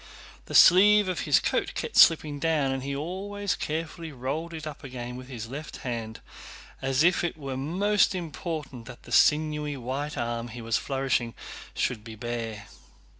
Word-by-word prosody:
The - - -5
sleeve 205 +3 +7
of 185 - -2
his - - +6
coat - - -1
kept 470 - -4
slipping 150 -3 +5
down 150 -3 +1
and 135 0 -2
he 140 +1 -3
always 195 +6 -3
carefully 160 +1 -4
rolled 140 +6 -4
it 160 -2 -7
up 155 0 -8
again 125 -2 -6
with 130 0 -9
his 120 -4 -7
left 145 +6 -7
hand, 115 -3 -4 0.6
as 135 +2 +2
if 175 +1 +3
it 170 -2 -2
were 135 -3 -5
most 190 +9 +2
important 155 -7 -5
that 125 -2 -11
the - - -13
sinewy 150 -1 +3
white 135 +4 -4
arm 120 0 -2
he 120 +1 -9
was 115 0 0
flourishing 135 -4 -1 0.4
should 110 -4 -1
be 110 -1 -9
bare. 115 -2 -5
140 Hz, 170 wpm, -27 LUFS, 125-165 Hz, 0.6 s, sleeve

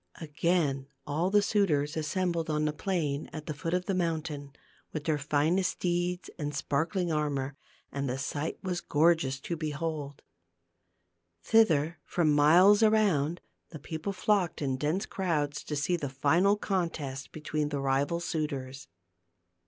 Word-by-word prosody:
Again 150 -3 0 0.2
all 155 +5 0
the 205 +1 +4
suitors 160 -9 +1
assembled 165 +1 -1
on 150 0 +1
the 150 - 0
plain 155 -5 -2
at 155 -1 -7
the 155 - -3
foot 165 +4 -2
of 180 0 -1
the 195 - -1
mountain, 160 -5 -2 0.4
with 155 - -4
their 155 -2 0
finest 155 +6 +1
steeds 175 0 -1
and 145 -1 -3
sparkling 165 +6 0
armor, 145 -3 -1 0.4
and 140 -1 -2
the 125 - -2
sight 145 +3 -3
was 180 -2 -2
gorgeous 150 -3 +2
to 170 - -3
behold. 155 -2 -4 1.2
Thither, 165 -8 +3
from 160 -4 +1
miles 175 +8 +6
around, 190 -8 +3 0.3
the 160 - -8
people 160 +5 -4
flocked 195 -3 +1
in 135 -3 -1
dense 150 +8 -1
crowds 150 -6 -1
to 150 - -3
see 145 +5 +1
the 145 -4 -4
final 170 +10 +3
contest 165 -10 -3
between 150 -1 -2
the 145 -1 -2
rival 140 +4 +1
suitors. 140 -6 -4
155 Hz, 145 wpm, -29 LUFS, 145-175 Hz, 1.2 s, miles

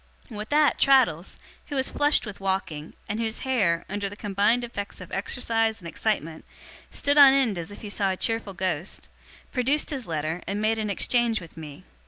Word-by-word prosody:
With 215 0 -6
that, 300 0 +3
Traddles, 235 - +3 0.3
who 290 - -5
was 265 -1 +1
flushed 290 -2 +3
with 205 -2 -8
walking, 190 -6 -3
and 210 +2 -3
whose 225 -1 -2
hair, 200 -11 +1
under 205 -1 -3
the 205 - -9
combined 205 +4 +1
effects 205 -4 -6
of 185 - -10
exercise 225 +2 0
and 170 - -9
excitement, 165 -4 -2 0.5
stood 285 +1 +2
on 275 -2 +10
end 260 -7 +2
as 165 - -6
if 205 - -11
he 210 - -7
saw 200 -1 0
a 190 - -2
cheerful 225 -3 -1
ghost, 185 -1 -3 0.4
produced 270 +5 +1
his 265 -5 -4
letter 160 +1 -2
and 200 +1 -2
made 220 +1 +1
an 215 -1 -2
exchange 235 +2 +2
with 170 -3 -13
me. 155 -3 -10
210 Hz, 190 wpm, -26 LUFS, 185-245 Hz, 0.5 s, on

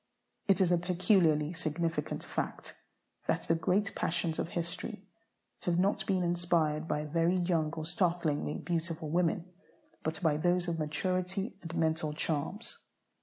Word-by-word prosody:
It 195 -1 +4
is 180 -2 +4
a 175 - +4
peculiarly 175 -3 +3
significant 165 -1 -2
fact - - -4 0.5
that - - +1
the - - +2
great 180 +5 +1
passions 165 -1 -1
of - - 0
history 180 +5 -4 0.5
have 175 -1 0
not 195 +3 +2
been 185 -2 +2
inspired 170 -3 +2
by 150 -1 -1
very 165 +4 +2
young 170 -4 +1
or 160 -1 -4
startlingly 170 -4 0
beautiful 165 -2 -2
women, 175 +1 +1 0.5
but 160 0 -2
by 155 -3 +3
those 175 +2 +2
of 165 -1 -1
maturity 185 +6 -1
and 165 0 -6
mental 160 -1 +1
charms. 165 +9 -2
170 Hz, 140 wpm, -32 LUFS, 160-180 Hz, 0.5 s, It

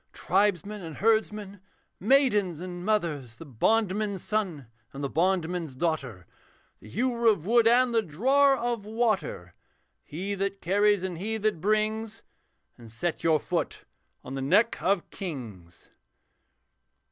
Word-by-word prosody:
Tribesmen 200 +2 0
and 165 -3 -8
herdsmen, 210 -2 0 0.4
maidens 210 - +3
and 175 0 -6
mothers; 165 - -1
The 165 - -10
bondman's 200 - 0
son 190 -10 -2 0.3
and 140 +1 -6
the 140 - -1
bondman's 175 -4 0
daughter, 130 - -2 0.5
The 110 - -14
hewer 235 - 0
of 200 -8 +3
wood 230 +2 +4
and 245 +1 +4
the 225 - +3
drawer 265 - +3
of 235 -3 -2
water, 215 - -1 0.5
He 190 +7 -5
that 195 0 -2
carries 205 +2 +2
and 180 -3 -4
he 220 +4 -2
that 215 -6 -1
brings, 215 +2 -1 0.6
And 115 -1 -12
set 170 +9 -3
your 160 -2 +3
foot - - -3 0.4
on 130 - -8
the 135 - -3
neck 205 +12 +2
of 190 -1 +1
kings.' 115 - -8
195 Hz, 135 wpm, -27 LUFS, 160-215 Hz, 0.6 s, wood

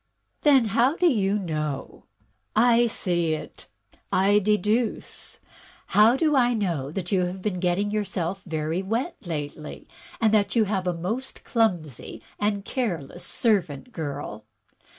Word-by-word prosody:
Then, 275 -5 +5
how 250 +6 +3
do 360 - +1
you 210 - +3
know?*' 155 -7 -4 0.5
I 235 +1 +5
see 175 -7 0
it, - - -9 0.4
I 200 +2 +4
deduce 210 +3 0
it. - - -30 0.5
How 220 +5 +5
do 305 0 +2
I 245 -2 +4
know 170 -11 -1
that 175 +3 -4
you 185 -2 +3
have 180 +2 -5
been 195 -4 -1
getting 185 +3 0
yourself 195 -3 -2
very 160 +2 -1
wet 230 - -2
lately, 150 -1 -6 0.3
and 220 -2 +3
that 210 +1 +2
you 230 - +5
have 195 -3 -1
a 180 - +1
most 220 +11 -4
clumsy 175 - -1 0.2
and 205 -1 0
care 235 - -1
less 145 +5 -10
servant 195 - 0
girl? 140 - -5
195 Hz, 145 wpm, -25 LUFS, 170-225 Hz, 0.5 s, Then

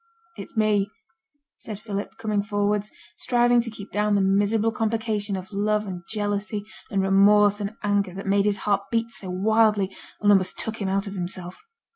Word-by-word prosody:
'It's 245 - -10
me,' 210 -2 +2 0.7
said 215 -3 -7
Philip, 205 -2 -5
coming 215 -2 0
forwards, 205 0 0 0.3
striving 240 -1 +3
to 230 - -5
keep 215 -2 -10
down 210 0 +1
the 200 - +3
miserable 205 +3 +2
complication 220 -2 -1
of 190 +2 -7
love 210 +1 +1
and 185 -3 -6
jealousy, 205 -1 -2 0.2
and 195 -1 0
remorse 205 +2 +5
and 205 +2 -4
anger, 200 -3 0
that 195 - -6
made 200 0 +2
his 205 -1 +1
heart 200 -1 +2
beat 230 0 0
so 190 -4 -4
wildly, 210 +1 +2 0.2
and 205 0 +4
almost 190 -2 +2
took 220 0 -3
him 195 - -1
out 195 +1 0
of 200 - -6
himself. 180 - -5
205 Hz, 175 wpm, -24 LUFS, 195-215 Hz, 0.7 s, remorse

